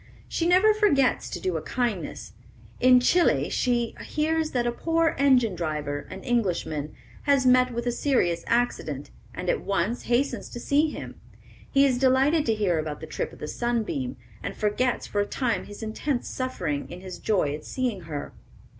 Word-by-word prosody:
She 335 - -1
never 375 +5 +5
forgets 340 - +2
to - - -5
do 180 -3 -1
a - - -4
kindness. 235 -5 -3 0.5
In 255 0 +7
Chili 345 +8 +3
she 240 -2 +1
hears 315 +1 0
that 245 -4 0
a 240 - +1
poor 330 +5 +1
engine 255 -6 +4
driver, 150 -4 -3
an 190 - -8
Englishman, 175 - -1 0.3
has 280 -3 +3
met 255 0 +5
with 235 0 -3
a 245 - +1
serious 235 -11 +1
accident, 245 +1 -1 0.2
and - - -5
at - - +1
once 200 +5 -1
hastens 245 +4 0
to 240 - -7
see 290 +5 +2
him. - - -8 0.5
He 275 0 +5
is 255 -3 +2
delighted 270 +4 +3
to 225 - +3
hear 190 -6 +1
about 155 -1 -4
the - - -7
trip - - -4
of - - -13
the - - -6
Sunbeam, 215 - -2 0.2
and - - -5
forgets 225 +4 0
for 205 - -1
a - - 0
time 230 -8 -1
his 205 +2 -9
intense 245 +4 -2
suffering 255 - -3
in 180 - -8
his 185 -1 -8
joy 185 -9 +1
at 150 - -6
seeing 245 -7 -2
her. 155 -3 -6
240 Hz, 180 wpm, -26 LUFS, 185-275 Hz, 0.5 s, In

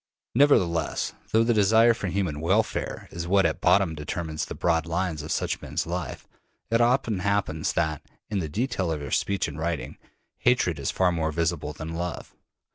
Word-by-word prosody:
Nevertheless, 90 - +2 0.2
though 110 +1 +4
the 120 +1 +2
desire 110 +3 +5
for 100 - -4
human 90 -5 -1
welfare 95 +8 0
is 85 0 -5
what 95 +1 +4
at - - 0
bottom 95 -4 +4
determines 80 +1 -4
the - - -7
broad 80 -2 +1
lines 85 -2 -1
of 75 - -6
such - - -1
men's - - -3
lives, 85 -4 -4 0.5
it 115 +1 +3
often 120 -4 +2
happens 95 -5 0
that, 80 -3 0 0.3
in 105 -2 -1
the 80 -4 -3
detail 95 - -1
of 80 - -2
their 70 -2 -6
speech 100 -1 0
and 75 0 -7
writing, 85 -1 -3 0.4
hatred 105 - +2
is 70 - -2
far 90 -1 +2
more 80 -2 -1
visible 85 -1 -1
than 80 +2 -7
love. 85 0 -5
85 Hz, 180 wpm, -26 LUFS, 80-100 Hz, 0.5 s, desire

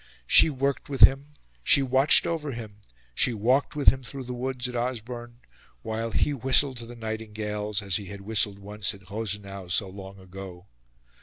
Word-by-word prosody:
She 160 - +6
worked 140 0 -2
with 135 -2 -4
him, 135 +2 +7 0.4
she 140 - +4
watched 135 +3 +4
over 150 -4 -2
him, 110 -3 -8 0.4
she 115 - +1
walked 125 +8 +1
with 145 - +7
him 135 - -3
through 130 +2 -7
the 125 0 -6
woods 125 0 -3
at 125 - -7
Osborne, 120 0 -4 0.4
while 115 +1 -3
he 145 - +1
whistled 130 0 +1
to 115 -1 -8
the 120 - -10
nightingales, 105 -2 -4
as 100 -1 +1
he 105 - -7
had 100 +1 -8
whistled 100 -1 0
once 105 0 -3
at 100 -1 -16
Rosenau 100 -3 -4
so 95 +3 +1
long 95 0 -10
ago. 95 -1 -10
110 Hz, 175 wpm, -26 LUFS, 100-130 Hz, 0.4 s, him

